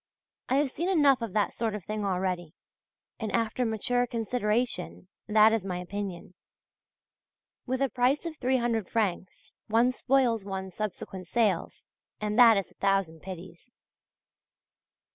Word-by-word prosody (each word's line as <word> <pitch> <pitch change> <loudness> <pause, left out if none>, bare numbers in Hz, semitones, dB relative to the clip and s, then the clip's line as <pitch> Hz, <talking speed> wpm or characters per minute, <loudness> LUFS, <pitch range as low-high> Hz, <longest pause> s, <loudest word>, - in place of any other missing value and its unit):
I 260 - +2
have 280 -1 +2
seen 345 +7 -2
enough 285 -8 +4
of 225 -5 -4
that 210 -2 +1
sort 220 -2 -2
of 205 - -7
thing 215 0 -3
already, 180 -4 -2 0.6
and 220 -2 -3
after 230 +2 0
mature 245 +3 0
consideration 225 -4 -2 0.2
that 215 +1 +6
is 225 -4 0
my 185 -2 -3
opinion. 185 0 -6 1.3
With 260 +2 0
a 270 - +1
price 255 +6 +1
of 330 -2 -4
300 240 -6 0
francs 195 -5 -2
one 230 +3 +3
spoils 250 -4 +1
one's 190 -1 -5
subsequent 190 -3 -5
sales, 210 -5 0 0.3
and 210 0 -2
that 230 -3 +8
is 195 - -3
a - - -28
thousand 195 -5 +1
pities. 180 +2 -10
215 Hz, 140 wpm, -28 LUFS, 190-245 Hz, 1.3 s, that